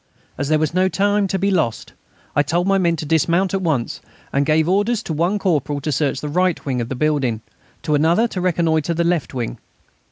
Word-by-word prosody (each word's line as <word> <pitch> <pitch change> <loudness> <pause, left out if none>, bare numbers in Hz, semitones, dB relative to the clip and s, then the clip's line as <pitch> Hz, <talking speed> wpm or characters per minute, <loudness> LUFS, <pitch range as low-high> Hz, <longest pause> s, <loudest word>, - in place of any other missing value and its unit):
As 140 +1 -3
there 155 - +4
was 155 0 -1
no 185 +1 +2
time 205 +1 +1
to 190 - -1
be 200 +2 +1
lost, 155 - -1 0.4
I 145 - +5
told 170 +5 0
my 195 0 +2
men 170 -2 +2
to 155 - -5
dismount 170 +5 +1
at 195 - 0
once, 150 -9 -1 0.3
and 140 0 +1
gave 155 +1 +3
orders 205 +5 +1
to 160 - -4
one 170 +7 +1
corporal 150 -7 0
to 150 +2 -3
search 140 0 0
the 150 - -4
right 180 +3 0
wing 130 -3 -1
of 115 - -4
the 130 - -3
building, 135 -6 0 0.4
to 150 - 0
another 165 +10 +3
to 185 - -4
reconnoitre 170 -2 +1
the 170 - +1
left 170 -5 -1
wing. 120 -2 -4
160 Hz, 220 wpm, -20 LUFS, 145-185 Hz, 0.4 s, I